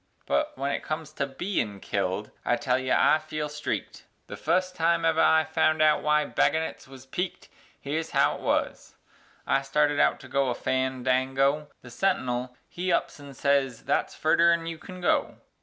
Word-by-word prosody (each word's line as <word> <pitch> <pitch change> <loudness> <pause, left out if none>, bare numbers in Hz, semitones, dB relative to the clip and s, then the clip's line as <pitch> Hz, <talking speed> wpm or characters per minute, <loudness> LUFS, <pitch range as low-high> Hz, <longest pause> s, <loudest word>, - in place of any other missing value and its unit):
But 300 0 -1
wen 140 +1 -1
it - - -2
comes 155 -1 -5
to 140 -2 -2
bein' 135 - -3
killed 100 +1 -2
I 120 - +2
tell 130 -1 0
ye 130 0 -4
I 155 - +4
felt 155 -1 -5
streaked 150 0 -4 0.2
The - - -8
fust 185 0 0
time 165 -1 +2
ever 160 0 +3
I 160 0 +5
found 155 0 +1
out 155 -1 +4
wy 150 0 +2
baggonets 160 +1 0
wuz 130 -1 -13
peaked; 180 +7 -4 0.3
Here's 160 +3 -3
how - - +3
it - - -13
wuz: - - -2 0.5
I 135 - +2
started 145 +1 +1
out - - +3
to - - -11
go 140 0 +1
to - - 0
a 120 - -1
fan 130 -1 -1
dango, 135 +3 +1 0.2
The 125 - -11
sentinul 125 -6 -1
he 180 +1 -3
ups 170 - 0
an' 140 -1 -11
sez 135 -3 +1
"Thet's - - -1
furder 170 +2 +4
'an 170 -1 0
you 165 -1 -5
can 185 +1 -10
go." 175 - +1
150 Hz, 190 wpm, -27 LUFS, 130-160 Hz, 0.5 s, I